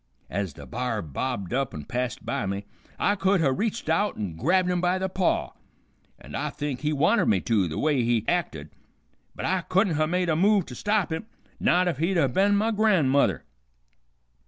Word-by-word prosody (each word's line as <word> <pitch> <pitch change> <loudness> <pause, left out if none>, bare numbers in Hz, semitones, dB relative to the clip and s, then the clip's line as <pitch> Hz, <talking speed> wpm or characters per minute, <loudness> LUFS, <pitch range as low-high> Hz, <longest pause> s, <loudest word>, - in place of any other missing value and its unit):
Ez 95 -4 -2
the - - -11
b'ar 125 -2 -3
bobbed 100 - -4
up 135 0 -1
and 75 -1 -8
passed 125 -2 -3
by 115 - -2
me 100 +1 -3 0.3
I 205 - +2
could 195 -1 +2
ha' 145 -5 +3
reached 225 - -2
out 165 +6 +1
an' 100 -7 -4
grabbed 180 - +2
him 180 -1 0
by 180 +1 +2
the 190 0 -1
paw, 185 -1 0 0.7
an' - - -13
I - - -2
think 145 -4 -4
he 150 0 0
wanted 165 +8 +2
me 100 - +3
to, 105 -6 +1
the 80 - -5
way 145 -4 +2
he 115 -2 +1
acted, 80 - -2 0.6
but - - -5
I 190 -1 +1
couldn't 185 -2 +1
ha' 155 0 +2
made 180 +1 0
a 160 - +2
move 195 +2 +3
to - - -9
stop 205 - 0
him, 160 +7 -5 0.3
not 180 +1 +3
if 165 -6 -1
he'd 175 +4 +1
ha' 135 -6 +2
ben 200 +4 +3
my 220 +2 +1
gran'mother. 185 -11 +2
160 Hz, 200 wpm, -26 LUFS, 120-190 Hz, 0.7 s, ha